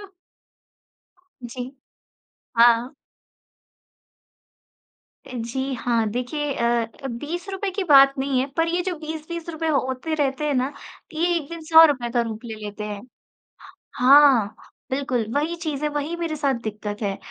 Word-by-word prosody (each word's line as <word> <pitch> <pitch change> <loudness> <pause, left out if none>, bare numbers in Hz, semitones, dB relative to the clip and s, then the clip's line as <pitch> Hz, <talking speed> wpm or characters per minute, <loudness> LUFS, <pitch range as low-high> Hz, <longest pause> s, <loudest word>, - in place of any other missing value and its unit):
हाँ। 405 - -10 1.4
जी। 245 +2 -6 0.9
हाँ। 235 +1 +5 2.4
अ, - - -11
जी 260 +4 -3
हाँ, 230 -2 0
देखिए 275 +5 -3
अ 235 - 0 0.4
अ, - - -2
₹20 350 - -4
की 395 +1 -2
बात 275 -4 +7
नहीं 265 -1 0
है, 260 - +1
पर 330 0 +2
ये 350 +1 0
जो 365 -1 -2
₹20-20 320 +1 -5
होते 275 +1 -1
रहते 290 0 -1
हैं 290 - +1
ना, 260 +2 0 0.4
ये 320 +2 0
1 300 -2 -6
दिन 335 -1 -7
₹100 310 -7 +6
का 240 0 +2
रूप 225 -1 -5
ले 225 - -6
लेते 205 0 -6
हैं। 205 -1 -5 0.9
हाँ, 255 -5 +6 0.4
बिल्कुल 260 -4 -1
वही 305 +4 0
चीज़ 310 -4 -4
है, 300 - +1
वही 295 +3 -3
मेरे 335 -2 -3
साथ 285 -2 +1
दिक्कत 210 0 -5
है। 200 -2 -2
275 Hz, 140 wpm, -23 LUFS, 240-315 Hz, 2.4 s, बात